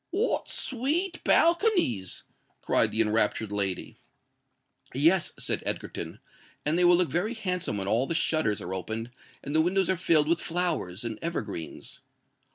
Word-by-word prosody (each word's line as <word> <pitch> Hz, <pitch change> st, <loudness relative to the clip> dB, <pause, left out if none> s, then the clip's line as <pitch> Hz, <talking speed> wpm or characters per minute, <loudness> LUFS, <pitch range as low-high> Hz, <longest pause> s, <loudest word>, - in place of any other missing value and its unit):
"What 415 Hz, +7 st, -1 dB
sweet 315 Hz, +9 st, -1 dB
balconies!" 335 Hz, -, +2 dB, 0.4 s
cried -, -, +3 dB
the 110 Hz, -, +2 dB
enraptured 110 Hz, -1 st, +2 dB
lady. 100 Hz, -3 st, -2 dB, 1.0 s
"Yes," 160 Hz, +6 st, +3 dB
said -, -, 0 dB
Egerton: -, -, -4 dB, 0.5 s
"and 150 Hz, +2 st, +1 dB
they 180 Hz, -, +2 dB
will 175 Hz, 0 st, +6 dB
look 180 Hz, -2 st, +1 dB
very 205 Hz, +8 st, -1 dB
handsome 180 Hz, -, -2 dB
when 95 Hz, -1 st, -2 dB
all 115 Hz, +6 st, +2 dB
the 165 Hz, -, -2 dB
shutters 155 Hz, -, +1 dB
are 90 Hz, -, -5 dB
opened 110 Hz, +6 st, -4 dB, 0.3 s
and 145 Hz, +2 st, -4 dB
the 160 Hz, -, +5 dB
windows 185 Hz, +2 st, +2 dB
are 190 Hz, -, 0 dB
filled 155 Hz, -4 st, +3 dB
with 170 Hz, +1 st, +1 dB
flowers 165 Hz, -, -2 dB
and 115 Hz, -2 st, -5 dB
evergreens." 110 Hz, -, -5 dB
160 Hz, 150 wpm, -27 LUFS, -, 1.0 s, will